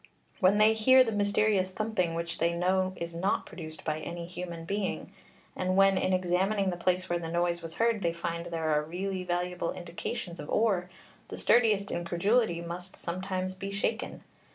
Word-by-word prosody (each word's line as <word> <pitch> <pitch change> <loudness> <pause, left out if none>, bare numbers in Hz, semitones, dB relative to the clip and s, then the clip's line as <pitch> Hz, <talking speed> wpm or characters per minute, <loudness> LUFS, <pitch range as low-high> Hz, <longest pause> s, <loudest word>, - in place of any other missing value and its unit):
When 195 0 +5
they 215 +1 +6
hear 260 +4 +6
the 225 - -2
mysterious 205 -2 +2
thumping 185 -4 -1
which 170 0 -3
they 170 0 +2
know 185 +2 +1
is 170 -1 -5
not 185 +4 0
produced 160 -1 -9
by 155 -1 -1
any 170 +1 -5
human 170 -1 -6
being, 200 +2 -3 0.4
and 185 0 0
when 195 0 +5
in 185 - +1
examining 185 +2 +1
the - - -3
place 185 +1 0
where 175 -1 0
the 165 -1 -5
noise 170 0 0
was 165 0 -8
heard 230 -2 +2
they 170 -2 +1
find 170 0 -4
there 165 -2 -1
are 150 0 +3
really 185 +4 -3
valuable 180 -1 -2
indications 175 +2 -5
of 150 - -7
ore, 195 -5 +1 0.4
the - - -6
sturdiest 215 -4 +3
incredulity 175 +3 +1
must 175 +2 -7
sometimes 185 +1 -3
be 195 +1 -6
shaken. 200 +3 -2
180 Hz, 175 wpm, -29 LUFS, 170-200 Hz, 0.4 s, they